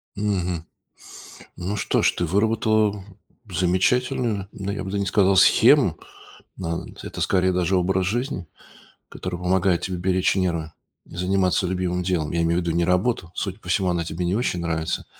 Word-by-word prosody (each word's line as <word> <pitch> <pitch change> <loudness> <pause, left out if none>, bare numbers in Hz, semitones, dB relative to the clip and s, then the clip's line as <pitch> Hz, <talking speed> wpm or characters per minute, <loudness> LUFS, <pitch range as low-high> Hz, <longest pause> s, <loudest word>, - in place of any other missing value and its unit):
Мгм. 90 -5 -2 0.9
Ну 95 +4 -3
что - - 0
ж, - - +4
ты 85 - -2
выработала 105 +2 +1 0.5
замечательную, 100 +3 +1
да, 100 0 -4
я 100 -1 -4
бы 95 - -5
да 100 - -1
не 100 - -1
сказал 95 -1 +3
схему, - - +5 0.6
нан 85 -2 -5
это - - -7
скорее 95 -1 +2
даже 90 +1 +1
образ 95 +1 +1
жизни, 115 - -2 0.6
который 90 -1 -5
помогает 90 0 +1
тебе 95 -1 -3
беречь 95 +2 +1
нервы 85 -4 -1 0.3
и - - -12
заниматься 90 +1 +1
любимым 90 0 -1
делом. 85 -4 -1
Я 85 0 +1
имею 85 +1 +1
ввиду 85 -1 -2
не 85 +1 +1
работу, 90 0 0
судя 95 -2 -4
по - - -13
всему, 95 +1 +1
она 85 -1 0
тебе 85 +2 -4
не 90 - 0
очень 105 -6 -1
нравится, 80 -1 -2
90 Hz, 165 wpm, -23 LUFS, 85-100 Hz, 0.9 s, схему